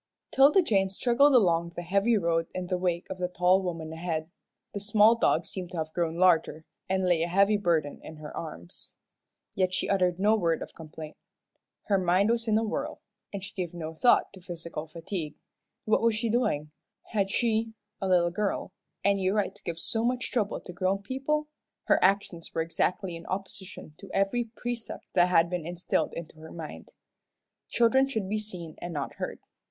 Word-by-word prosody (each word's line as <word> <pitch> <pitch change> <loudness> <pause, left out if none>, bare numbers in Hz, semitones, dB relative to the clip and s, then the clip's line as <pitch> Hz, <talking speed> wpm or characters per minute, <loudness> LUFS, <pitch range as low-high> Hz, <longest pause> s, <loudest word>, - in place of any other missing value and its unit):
'Tilda 290 +8 +6
Jane 195 -9 +2
struggled 255 +8 +4
along 170 -6 +3
the 175 - -4
heavy 200 +6 +2
road 165 -3 +1
in 185 - -2
the 180 0 -1
wake 175 -1 -1
of 190 - -5
the 180 - 0
tall 180 +1 +3
woman 165 -3 -4
ahead. 160 -1 -3 0.4
The 200 - -3
small 210 +2 +5
dog 230 - +2
seemed 185 -3 -6
to - - -4
have 155 0 -3
grown 165 -2 -1
larger, 165 -3 +3 0.2
and 190 0 +1
lay 175 -3 +3
a 170 - +1
heavy 200 +4 +4
burden 165 -7 0
in 160 - -10
her 150 -1 -9
arms. 85 - -9 0.6
Yet 185 -1 +1
she - - -1
uttered 180 -2 +2
no 210 +3 +4
word 170 -6 +1
of - - -11
complaint. 155 -1 -10 0.7
Her 200 -2 +2
mind 185 +4 +3
was 235 0 0
in 215 -1 +3
a 225 - +1
whirl, 220 - -3 0.3
and 200 -2 -5
she 195 - -8
gave 175 -2 -4
no 160 -1 -5
thought 240 +7 +3
to 190 - -12
physical 170 -3 -6
fatigue. 165 -1 -5 0.5
What 215 - +3
was 230 -1 +3
she 230 +1 -1
doing? 155 -11 0 0.4
Had 200 -3 +1
she 225 0 0 0.3
a 195 - 0
little 175 -2 +3
girl 200 +1 -2 0.3
any 195 -1 +2
right 205 0 0
to - - -19
give 170 -2 -4
so 225 +6 -1
much 250 +1 -1
trouble 215 -5 0
to 180 - -9
grown 190 +2 0
people? 270 +7 -1 0.4
Her - - +3
actions 190 -3 +1
were 165 - +1
exactly 180 +2 -1
in 165 0 -10
opposition 190 -4 -6
to 195 - -11
every 195 +5 +1
precept 240 0 -6
that 175 0 +5
had 170 -2 +5
been 175 -2 -3
instilled 175 +1 -1
into 160 -1 -8
her 160 0 -11
mind. 160 -2 -8 0.8
Children 250 +3 +3
should 220 -7 -2
be 215 +2 -1
seen 180 -7 -7
and 175 - -5
not 140 -2 -3
heard. - - -4
185 Hz, 190 wpm, -28 LUFS, 170-215 Hz, 0.8 s, Tilda